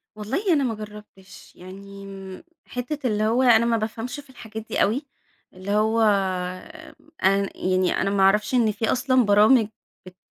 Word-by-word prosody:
والله 270 - -1
أنا 285 -3 +2
ما 235 -4 -1
جرّبتش، 210 -3 -13
يعني 195 - -11 0.2
حتّة 255 +3 -4
اللي 215 -2 0
هو 230 +4 +2
أنا 235 -2 +5
ما 235 -1 +2
بافهمش 225 +5 -5
في 285 -1 -14
الحاجات 220 -3 -9
دي - - 0
أوي، 250 +8 +1 0.5
اللي 185 +2 -6
هو 220 +2 +2 1.2
أن 195 +1 +2
يعني 185 0 0
أنا - - 0
ما 195 -1 +1
أعرفش 210 +5 +3
إن 235 -4 +3
في 220 +2 -1
أصلًا 255 -1 +2
برامج 210 +3 +5 0.4
بت 185 0 -14
215 Hz, 155 wpm, -23 LUFS, 195-245 Hz, 1.2 s, أنا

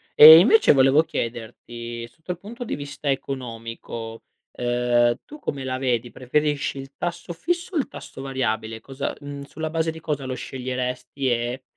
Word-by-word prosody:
E 160 +2 +12
invece 425 - +6
volevo 135 +3 +5
chiederti 115 -2 -5
sotto 160 +9 -8
al 175 - -5
punto 230 +6 -8
di 240 - -3
vista 145 0 -5
economico, 115 -3 -6 0.3
ehm, 120 -1 +2
tu 300 - -11
come 140 - -4
la 130 -1 -2
vedi, 125 -2 0
preferisci 145 +2 -1
il 135 +1 -9
tasso 175 0 -4
fisso 350 - -2
o - - +2
il 285 - +1
tasso - - -10
variabile? 115 -4 -2
Cosa, 135 +3 -4
mhmm, 145 -1 -7
sulla 155 +3 -5
base 160 0 0
di 160 - -10
cosa 145 -3 -3
lo 130 - -3
sceglieresti 130 +1 -3
e, 120 +2 -1
135 Hz, 165 wpm, -24 LUFS, 120-155 Hz, 0.3 s, E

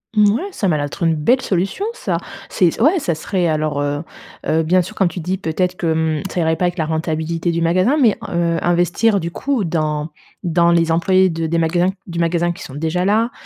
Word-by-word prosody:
Ouais, 210 - +3
ça 215 - -2
m'a 155 - +2
l'air 145 - -1
d'être 145 +5 -6
une 165 -1 +3
belle 240 - +2
solution 195 - -1
ça. 485 - -3 0.3
C'est 175 -3 +2
c - - -7
ouais 310 +10 +4
ça 225 - -1
serait 180 +3 -1
alors, 155 -2 0
heu, 145 +1 -2 0.4
heu, 160 +1 +2
bien 180 +3 +3
sûr 180 - -7
quand 190 - +2
tu 170 +1 -5
dis 180 +3 -2
peut-être 180 +1 -1
que, 175 - -3
hem, 160 -1 0
ça - - -2
irait 160 -1 +2
pas 170 - -3
avec 175 +1 -1
la 160 - 0
rentabilité 160 +1 -2
du 170 0 -1
magasin 185 - +2
mais, 225 -5 +4
heu, 170 -1 0
investir 175 +5 +2
du 170 -1 -4
coup 265 0 -1
dans 155 -2 -1 0.3
dans 170 0 +3
les 165 -1 +2
employés 185 +3 +3
de 165 -1 -3
des 165 +1 0
magasins 175 +2 +2 0.2
du 170 -1 -5
magasin 170 +1 +1
qui - - -10
sont 130 - -10
déjà 160 +5 -1
là, 220 +5 +2
170 Hz, 230 wpm, -19 LUFS, 160-185 Hz, 0.4 s, ouais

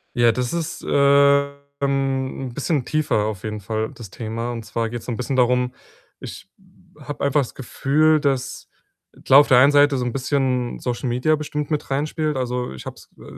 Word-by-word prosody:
Ja, 120 -1 +4
das 125 +3 -3
ist, 165 -1 -4
äh, - - -9 0.9
ähm, 135 -1 -1
'n - - -14
bisschen 150 -2 -1
tiefer 150 -9 0
auf 105 -4 -4
jeden 105 -1 -4
Fall, 110 +1 -3
das 110 -6 -11
Thema 115 +1 -4
und 115 -2 -6
zwar 115 0 -3
geht's 120 -1 -7
so 125 - -4
'n 115 - -4
bisschen 130 +1 -3
darum: 125 0 +2 0.5
Ich - - -9 0.5
habe 145 0 -7
einfach 140 +1 +2
das 125 - -7
Gefühl, 155 +4 +2
dass, 135 -2 -2 0.6
klar, 135 - +8
auf 145 - +4
der 125 - +5
einen 140 +3 +6
Seite 145 -1 +4
so 125 - -2
'n 120 - -3
bisschen 130 -2 -1
Social 125 0 -3
Media 125 +6 +2
bestimmt 150 0 -4
mit 150 - -2
reinspielt. 150 +1 -1
Also, 125 - -3
ich 65 - -10
habe - - -7
es, - - -16
äh, - - -15
130 Hz, 195 wpm, -22 LUFS, 120-145 Hz, 0.9 s, klar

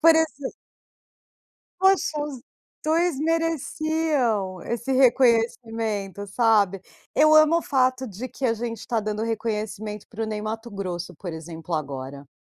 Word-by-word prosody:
Por 330 +1 +8
exem 315 -4 0 1.3
Poxa, 380 -5 +3
os 290 -4 -5 0.4
2 325 -1 +2
mereciam 310 - 0
esse 235 +3 -2
reconhecimento, 225 -5 +2
sabe. 205 -3 +3 0.3
Eu 310 +1 +6
amo 310 +2 +6
o - - -4
fato 260 -1 +1
de 225 +5 -6
que 270 - -7
a 230 -3 +3
gente 230 -1 -5
tá 230 -2 0
dando 215 0 -3
reconhecimento 215 -2 -3
para 225 0 -5
o - - -1
Ney 215 -1 -3
Matogrosso, 200 -6 -5
por 175 -3 -7
exemplo 160 +1 -6
agora. 140 -1 -5
230 Hz, 130 wpm, -25 LUFS, 205-285 Hz, 1.3 s, Por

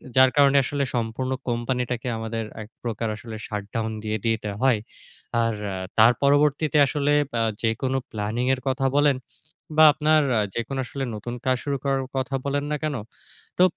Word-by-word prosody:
যার 130 0 +7
কারণে 140 -1 +5
আসলে 140 +2 -1
সম্পূর্ণ 120 +3 -2 0.2
company 120 +1 0
টা 125 - +1
কে - - -6
আমাদের 115 0 -3 0.2
এক 105 - -9
প্রকার 115 -1 -2
আসলে 110 0 -8
shut 105 -2 -4
down 110 -1 -1
দিয়ে 110 0 -1
দিতে 110 -2 0
হয়। 130 -5 +4 0.6
আর 115 -1 +1 0.4
তার 115 +3 +7
পরবর্তীতে 145 +1 +3
আসলে 145 0 0 0.3
আ - - +3 0.2
যেকোনো 130 +4 0
planning 110 +4 -2
এর 130 - -3
কথা 135 0 +1
বলেন 145 -2 +4 0.6
বা 155 - +8
আপনার 155 0 +3 0.2
আ - - +3
যেকোনো 125 +4 -3
আসলে 135 +1 -5
নতুন 120 +3 -5
কাজ 130 -1 +2
শুরু 140 -1 -1
করার 135 -1 +1
কথা 130 +1 -1
বলেন 140 0 0
না - - +1
কেন, 150 -2 -1 0.6
তো 180 - +6
130 Hz, 175 wpm, -24 LUFS, 115-140 Hz, 0.6 s, বা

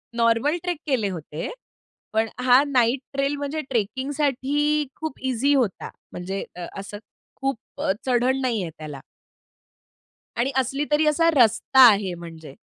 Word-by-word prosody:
Normal 230 +7 +2
trek 355 -4 -2
केले 250 -7 +1
होते. 160 -3 -6 0.6
पण 220 +1 +2 0.2
हा 255 +2 +6
नाईट 250 -1 +2
ट्रेल 275 +1 0
म्हणजे 290 +2 -3
ट्रेकिंगसाठी 280 +5 0
खूप 315 -3 -5
ईझी 265 +4 +2
होता. 245 -9 0 0.2
म्हणजे 190 +2 -4
अ, 180 - -6
असं 205 +1 -7 0.4
खूप 270 -2 0 0.5
चढण 255 +1 +2
नाहीये 225 -9 -1
त्याला. 150 -3 -8 1.4
आणि 250 +3 +1
असली 270 +3 0
तरी 300 +1 +3
असा 330 +2 +3
रस्ता 245 +2 +3
आहे 200 -3 -1
म्हणजे. 165 -4 -11
255 Hz, 130 wpm, -24 LUFS, 205-285 Hz, 1.4 s, हा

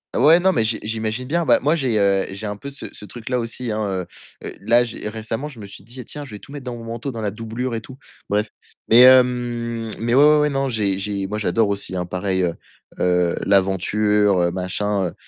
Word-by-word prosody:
Ouais, 155 +7 +6
non, 190 +1 +3
mais 115 - +2
j'i 110 0 0
j'imagine 110 +3 -3
bien. 170 +5 0
Bah, - - +5
moi, 150 +4 +3
j'ai, 130 -8 0
heu, 100 -1 +2
j'ai 100 +3 -6
un 105 0 -3
peu 140 +7 -8
ce 140 - -8
ce - - -11
truc-là 120 +3 -4
aussi, 115 0 -3
hein. 110 0 -1
Heu, 95 -3 -2 0.4
heu, - - -5
là 115 +4 +4
j'ai 115 -3 -5
récemment, 115 +5 -4
je 135 -6 -11
me 105 - -8
suis 95 -1 -12
dis: 120 +4 -9
«Tiens, 150 - -6
je 140 - -10
vais - - -9
tout - - -14
mettre 140 -2 -8
dans 125 -1 -4
mon 115 - -9
manteau, 115 +3 -5
dans 115 -3 -6
la 105 - -1
doublure 115 +4 -4
et 115 - -3
tout.» 130 +3 -12 0.3
Bref. 105 +1 0 0.4
Mais 115 - +7
hem 120 -3 +4
mais 115 +1 -1
ouais, 135 +3 +6
ouais, 150 0 +6
ouais, 150 - +2
non, 135 0 0
j'ai 100 -5 -1
j'ai 100 -1 -3
moi 105 +2 -3
j'adore 110 0 +1
aussi 100 -2 -1
hein, 90 -1 -2
pareil, 95 +1 -1
heu, 85 -2 0 0.5
heu, 90 -1 +2
l'aventure, 100 +1 +2
heu, 85 0 +2
machin. 95 +1 -2
110 Hz, 235 wpm, -21 LUFS, 100-125 Hz, 0.5 s, Mais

